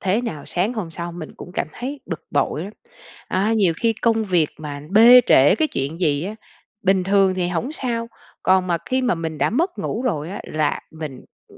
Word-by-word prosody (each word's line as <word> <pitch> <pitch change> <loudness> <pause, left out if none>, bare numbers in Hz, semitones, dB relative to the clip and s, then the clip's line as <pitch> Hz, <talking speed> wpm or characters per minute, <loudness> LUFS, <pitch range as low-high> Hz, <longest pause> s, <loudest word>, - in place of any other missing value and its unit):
thế 195 +3 +1
nào 155 -11 -5
sáng 195 +7 0
hôm 200 -8 -4
sau 170 +1 -6
mình 165 -3 -8
cũng 180 - -10
cảm - - -1
thấy 270 +3 -6
bực 165 - -6
bội 150 +2 0
lắm. 205 - -8 0.6
A, 200 +4 +1
nhiều 200 -7 +3
khi 230 -1 +3
công 225 -2 +2
việc 175 -6 +2
mà 145 -2 -6
bê 235 +4 +9
trễ 140 +7 +6
cái 310 +6 +1
chuyện 140 +6 -4
gì 150 -2 +1
á, 210 +3 -4 0.5
bình 190 -1 +2
thường 195 -1 +3
thì 180 -1 -1
hổng 225 - -2
sao, 235 -5 -3 0.3
còn 185 0 +3
mà 170 -2 0
khi 260 0 0
mà 250 -5 +2
mình 160 -2 -5
đã - - +2
mất 340 - 0
ngủ 230 - -3
rồi 170 - -2
á 200 - -6
là 155 -1 -1
mình, 155 -3 -6
ừm, - - -20
185 Hz, 220 wpm, -21 LUFS, 160-225 Hz, 0.6 s, bê